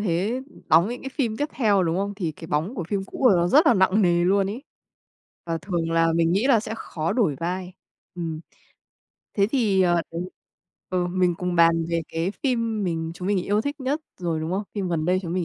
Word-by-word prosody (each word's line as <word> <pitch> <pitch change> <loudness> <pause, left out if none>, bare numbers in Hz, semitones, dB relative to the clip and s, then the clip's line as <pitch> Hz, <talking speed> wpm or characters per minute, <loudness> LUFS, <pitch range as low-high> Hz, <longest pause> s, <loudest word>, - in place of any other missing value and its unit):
thế 205 +6 0 0.3
đóng 170 +5 +5
những 245 +1 -5
cái 270 - -4
phim 255 -5 -2
tiếp 290 +4 -1
theo, 205 -6 +2
đúng 165 -1 0
không? 200 +1 -2
Thì 175 -6 -3
cái 165 - -11
bóng 160 - -1
của 180 - -4
phim 200 -2 -1
cũ - - -10
của 255 - +7
là 190 - +5
nó 170 0 +2
rất 300 - +5
là 245 - +6
nặng 190 +2 +3
nề 175 -1 +3
luôn 195 +2 +3
ấy. 215 +7 -5 0.8
Và 165 -1 -1
thường 170 -2 -2
là 165 0 +3
mình 165 0 +2
nghĩ 200 +7 +2
là 250 -6 +5
sẽ 220 - -6
khó 160 -6 -3
đổi 195 - +1
vai. 180 +2 -3 0.4
Ừm. 165 -3 -4 1.0
Thế 200 -1 +4
thì, 215 -6 +2
ờ, 175 -2 +3
đấy 170 +1 -3 0.7
ừ, 180 -1 0
mình 180 0 +1
cùng 180 -1 -2
bàn 165 0 +4
về 170 -1 0
cái 165 +3 -2
phim 230 -5 0
mình 165 -2 -2
chúng 180 +2 -5
mình 205 -1 +2
yêu 205 +1 +1
thích 285 +5 -4
nhất 275 +4 -1 0.2
rồi, 165 -3 -1
đúng 160 +1 -3
không? 195 +2 -1
Phim 195 -3 -2
gần 165 -3 -1
đây 180 +2 +2
chúng 170 -2 -4
mình 180 -1 0
185 Hz, 235 wpm, -24 LUFS, 170-215 Hz, 1.0 s, của